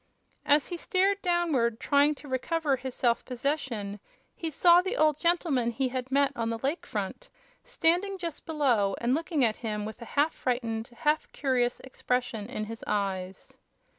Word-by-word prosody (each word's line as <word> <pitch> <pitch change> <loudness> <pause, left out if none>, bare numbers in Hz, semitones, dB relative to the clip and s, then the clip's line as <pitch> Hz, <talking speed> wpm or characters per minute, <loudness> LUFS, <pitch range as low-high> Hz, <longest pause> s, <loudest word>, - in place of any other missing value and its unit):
As 290 +1 +4
he 350 - -4
stared 390 +3 +1
downward, 315 - +1
trying 290 +1 +3
to 290 - -13
recover 285 +3 0
his 260 0 -6
self 235 -2 +1
possession, 245 -6 -3 0.4
he 330 - -3
saw 345 +3 +6
the 385 +7 -3
old 305 -1 +3
gentleman 330 -8 +2
he 255 +2 -1
had 255 0 -4
met 280 0 +3
on 230 -1 -1
the 230 - -2
Lake 275 +8 -2
Front - - -4 0.3
standing 390 -4 +1
just 340 -4 -6
below 245 -11 +2
and 240 +1 +1
looking 310 -3 +1
at 220 -1 0
him 210 -3 -3
with 220 +3 -8
a - - -6
half 300 +3 +3
frightened, 230 -3 -2
half 300 +6 -1
curious 250 -3 0
expression 250 -4 -2
in 215 -4 -3
his 225 +1 -8
eyes. 195 -2 -3
265 Hz, 165 wpm, -28 LUFS, 235-325 Hz, 0.4 s, saw